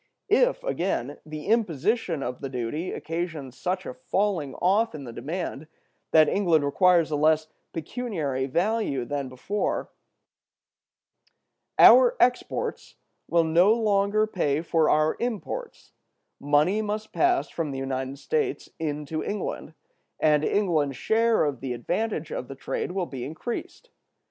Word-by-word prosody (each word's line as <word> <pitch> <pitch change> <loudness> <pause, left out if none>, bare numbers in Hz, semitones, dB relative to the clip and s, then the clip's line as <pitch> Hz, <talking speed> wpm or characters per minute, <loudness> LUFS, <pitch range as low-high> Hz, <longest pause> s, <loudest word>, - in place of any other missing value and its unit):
If, - - +3
again, 170 - -2
the 155 0 -7
imposition 195 - 0
of 125 0 -5
the 135 - -4
duty 130 +7 -3
occasions 160 -6 -4
such 185 +6 -2
a - - -5
falling 200 - -1
off 200 +2 +2
in 145 - -7
the 120 -3 -8
demand 160 +1 -5 0.4
that 155 -1 +6
England 170 -7 +2
requires 170 +2 +3
a - - +1
less 155 +1 +2 0.2
pecuniary 160 - -3
value 170 - 0
than 140 0 -3
before, 190 +11 -2 1.9
our - - +8
exports 250 0 0 0.3
will 170 -1 +3
no 170 +6 +4
longer 210 -1 +2
pay 160 -8 -1
for 165 -2 +2
our 155 +1 +3
imports; 245 - -5 0.5
money 150 +9 +2
must 215 +1 -4
pass 355 0 +2
from 165 -3 -3
the 135 - -5
United 135 0 -3
States 435 - -2
into 150 0 -3
England; 190 -5 -4 0.4
and 150 -1 +3
England's 155 -9 +1
share 225 - +2
of 140 -4 -2
the 130 -2 -3
advantage 170 - -2
of 125 - -4
the 135 - -8
trade 155 - -4
will 190 -2 -1
be 130 -6 -7
increased. 230 - -6
165 Hz, 135 wpm, -26 LUFS, 145-210 Hz, 1.9 s, our